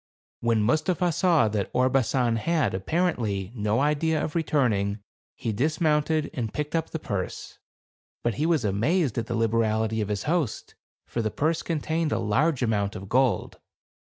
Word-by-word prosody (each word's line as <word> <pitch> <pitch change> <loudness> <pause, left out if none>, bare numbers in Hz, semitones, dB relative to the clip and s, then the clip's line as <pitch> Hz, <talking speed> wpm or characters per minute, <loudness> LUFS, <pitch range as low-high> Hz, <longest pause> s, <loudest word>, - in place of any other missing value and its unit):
When 115 -2 +1
Mustapha 170 - +1
saw 165 -7 +3
that 105 -2 -2
Orbasan 125 -2 +2
had, 155 +2 +1
appar 165 - +1
ently, 100 -3 -3
no 105 +1 0
idea 150 +2 +1
of 150 - -3
returning, 120 - +1 0.4
he 115 -3 -3
dismounted, 155 +4 +1
and 115 -5 -3
picked 150 +2 -3
up 165 -1 -1
the - - -3
purse; 100 - -5 0.6
but 120 - +1
he 160 - +2
was 160 -9 +2
amazed 120 - +1
at 115 - -4
the 120 - -2
liberality 110 -1 +1
of 105 - -3
his 100 -1 -2
host; 160 -6 -1 0.3
for 120 - -3
the 110 - 0
purse 155 +9 0
contained 160 0 -1
a - - +1
large 130 +6 +1
amount 105 -3 0
of 95 0 -8
gold. 125 -6 +1
125 Hz, 160 wpm, -26 LUFS, 110-155 Hz, 0.6 s, saw